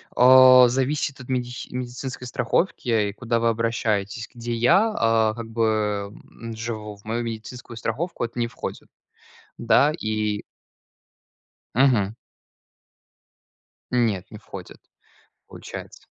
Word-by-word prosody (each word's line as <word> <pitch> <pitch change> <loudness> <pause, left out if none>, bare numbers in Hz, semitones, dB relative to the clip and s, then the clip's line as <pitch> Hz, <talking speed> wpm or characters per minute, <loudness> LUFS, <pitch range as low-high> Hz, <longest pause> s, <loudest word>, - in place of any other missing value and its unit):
А. 130 0 +8
Зависит 135 +2 -1
от 125 - -11
медихи 125 -1 -3
медицинской 125 0 -5
страховки, 125 +3 -1 0.2
и - - -7
куда 115 +2 -1
вы 115 0 +2
обращаетесь. 110 -2 -1
Где 120 0 -5
я, 160 - +3
а, 115 -1 +3
как 115 -1 -7
бы, 115 0 0 0.6
м, 115 0 -8
живу. 110 -2 -5
В 100 - -22
мою 115 +2 -2
медицинскую 115 +1 -7
страховку 125 +8 -3
это 120 +1 -4
не 120 - +1
входит. - - -7 0.7
Да, 130 +5 +4
и 110 -3 -1 1.3
Мгм. 115 -6 +3 1.8
Нет, 115 -7 +1
не - - -10
входит. - - -10 0.7
Получается. - - -10
115 Hz, 115 wpm, -24 LUFS, 110-125 Hz, 1.8 s, А